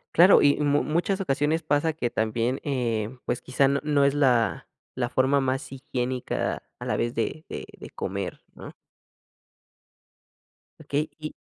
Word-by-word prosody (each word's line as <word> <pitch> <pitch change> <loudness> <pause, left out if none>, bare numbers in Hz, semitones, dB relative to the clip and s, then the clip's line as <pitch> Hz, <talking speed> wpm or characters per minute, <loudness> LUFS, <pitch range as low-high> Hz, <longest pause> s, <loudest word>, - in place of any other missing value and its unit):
Claro 180 +4 +8
y 145 0 +5
mu 145 0 +3
muchas 175 +5 0
ocasiones 155 -2 0
pasa 155 0 +1
que 135 -6 -2
también, 115 +3 -1
eh, 120 -4 -2
pues 120 - -2
quizá, 135 +2 +2
no 140 0 +1
no 145 -2 +3
es 140 - +3
la 125 -6 +2 0.3
la 120 -1 0
forma 135 +2 +2
más 135 +1 -2
higiénica 130 -1 -3 0.2
a - - -6
la - - 0
vez 120 +1 -1
de 150 +7 -2
de - - -6
de - - -10
comer, 95 -1 -4
¿no? - - -10 2.1
Okey, 145 +1 -1
¿y? 155 0 -5
135 Hz, 150 wpm, -26 LUFS, 125-150 Hz, 2.1 s, Claro